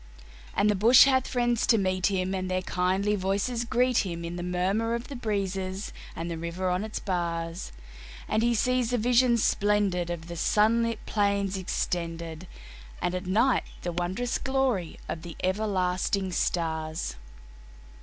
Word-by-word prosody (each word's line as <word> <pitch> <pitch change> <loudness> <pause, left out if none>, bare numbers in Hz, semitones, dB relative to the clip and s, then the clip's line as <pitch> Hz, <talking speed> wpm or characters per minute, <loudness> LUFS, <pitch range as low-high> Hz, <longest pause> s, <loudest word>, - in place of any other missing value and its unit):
And 200 - +3
the 210 - +4
bush 225 +6 +7
has 260 -2 +3
friends 240 -2 +1
to 225 - +5
meet 185 -2 +1
him, 190 -2 -1
and 185 -1 -2
their 185 0 -1
kindly 190 +3 +1
voices 200 +5 -1
greet 245 +1 +2
him 170 -3 -3
In 170 +1 -5
the 175 - -4
murmur 190 +6 0
of 235 +1 -6
the 280 - -6
breezes 195 -4 -3 0.2
and 165 - -4
the 165 - -4
river 175 +2 -2
on 180 +3 0
its 220 0 -5
bars, 170 -2 -3 0.6
And 215 - +1
he 235 +1 +2
sees 250 +1 +1
the 245 - +1
vision 240 +1 +4
splendid 205 -5 +1
of 170 -2 -4
the 170 0 -7
sunlit 230 +5 +2
plain 200 -2 +1
extended, 170 -2 -3 0.5
And 175 +1 -1
at 185 +1 -4
night 230 +7 +3 0.2
the 175 - -2
wondrous 180 +8 -2
glory 265 -10 0
of 160 - -4
the 170 0 -8
everlasting 190 -1 0
stars. 160 - -1
190 Hz, 155 wpm, -27 LUFS, 180-225 Hz, 0.6 s, bush